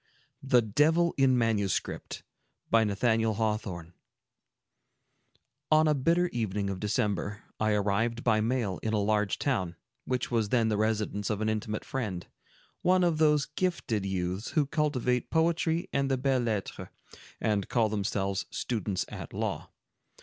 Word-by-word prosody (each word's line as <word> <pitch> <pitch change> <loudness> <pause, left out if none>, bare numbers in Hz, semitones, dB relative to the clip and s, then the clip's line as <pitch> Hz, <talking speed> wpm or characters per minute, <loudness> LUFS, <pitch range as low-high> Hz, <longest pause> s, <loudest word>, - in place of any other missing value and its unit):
THE 125 -3 +3
DEVIL 160 +10 +3
IN 135 -2 +4
MANUSCRIPT 105 -5 -1 0.5
On 110 -2 +4 3.0
a 155 - +4
bitter 165 +6 +2
evening 105 - -2
of 95 - -5
December, 105 0 -1 0.2
I 110 0 +2
arrived 105 +4 0
by 110 -2 +3
mail 115 -5 -1
in 110 - -2
a - - +2
large 105 -1 +1
town, 95 -11 -1 0.3
which 125 -1 -2
was 115 -3 +1
then 115 -2 +2
the 105 - 0
residence 105 -1 -1
of 105 -2 -1
an 110 0 0
intimate 110 0 -3
friend, 105 -10 -3 0.6
one 185 0 +3
of 170 -3 +1
those 150 -2 +4
gifted 150 - -2
youths 95 +1 -2
who 150 -3 +3
cultivate 135 -4 0
poetry 165 +1 +1
and 140 0 +1
the 135 - +1
belles 130 -1 +1
lettres, 105 -4 -3 0.5
and 105 -2 0
call 115 -3 +2
themselves 100 -2 -2
students 105 -5 -2
at - - -8
law. - - -3
110 Hz, 135 wpm, -29 LUFS, 105-135 Hz, 3.0 s, IN